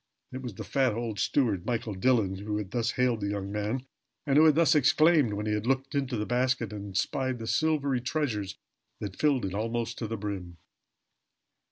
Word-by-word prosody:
It 130 Hz, -, -6 dB
was 120 Hz, -6 st, -6 dB
the -, -, -6 dB
fat 130 Hz, -5 st, +1 dB
old 115 Hz, -3 st, -3 dB
steward, 110 Hz, -11 st, +1 dB
Michael 115 Hz, -1 st, -2 dB
Dillon, 100 Hz, -2 st, +1 dB
who 105 Hz, +1 st, -3 dB
had 100 Hz, -2 st, -5 dB
thus 120 Hz, -1 st, 0 dB
hailed 125 Hz, -3 st, +1 dB
the 100 Hz, -, -1 dB
young 100 Hz, -1 st, -3 dB
man, 105 Hz, +5 st, -2 dB, 0.4 s
and 140 Hz, -2 st, +1 dB
who 155 Hz, +2 st, +7 dB
had 155 Hz, -2 st, +6 dB
thus 165 Hz, 0 st, +5 dB
exclaimed 150 Hz, -3 st, +4 dB
when 105 Hz, +1 st, -3 dB
he 105 Hz, -, 0 dB
had 105 Hz, +2 st, -2 dB
looked 135 Hz, +1 st, 0 dB
into 135 Hz, -4 st, -1 dB
the 105 Hz, -, -1 dB
basket 125 Hz, -3 st, 0 dB
and 100 Hz, -2 st, -7 dB
espied 130 Hz, +4 st, 0 dB
the 115 Hz, -, -7 dB
silvery 140 Hz, -1 st, +1 dB
treasures 120 Hz, -7 st, -2 dB, 0.4 s
that 100 Hz, -3 st, -5 dB
filled 140 Hz, -7 st, +2 dB
it 95 Hz, -, -4 dB
almost 115 Hz, +3 st, -2 dB
to 115 Hz, -, -3 dB
the 115 Hz, +1 st, -4 dB
brim. 95 Hz, -4 st, -5 dB
115 Hz, 200 wpm, -28 LUFS, 105-130 Hz, 0.4 s, who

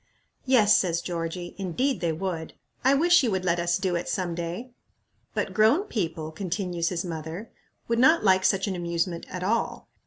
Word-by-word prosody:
"Yes," 225 Hz, -5 st, +5 dB
says 170 Hz, -3 st, +2 dB
Georgie, 175 Hz, 0 st, -4 dB
"indeed, 230 Hz, -, -1 dB
they 170 Hz, -2 st, +1 dB
would. 165 Hz, -1 st, -4 dB, 0.3 s
I 265 Hz, +2 st, +5 dB
wish 345 Hz, +4 st, +5 dB
you 250 Hz, -, +1 dB
would 190 Hz, -2 st, -1 dB
let 175 Hz, -1 st, +2 dB
us 170 Hz, 0 st, +1 dB
do 190 Hz, -2 st, -1 dB
it 170 Hz, -, -3 dB
some 180 Hz, -3 st, -1 dB
day." 170 Hz, +9 st, -5 dB, 0.6 s
"But -, -, -2 dB
grown 225 Hz, -, +4 dB
people," 165 Hz, -, -3 dB
continues 175 Hz, -1 st, -2 dB
his 175 Hz, 0 st, -3 dB
mother, 165 Hz, +5 st, -6 dB, 0.4 s
"would 230 Hz, 0 st, +1 dB
not 320 Hz, +7 st, +5 dB
like 190 Hz, -2 st, +4 dB
such 195 Hz, 0 st, +2 dB
an 195 Hz, -3 st, -2 dB
amusement 170 Hz, 0 st, -2 dB
at 180 Hz, 0 st, -5 dB
all. 225 Hz, +5 st, -1 dB
185 Hz, 180 wpm, -26 LUFS, 170-215 Hz, 0.6 s, Yes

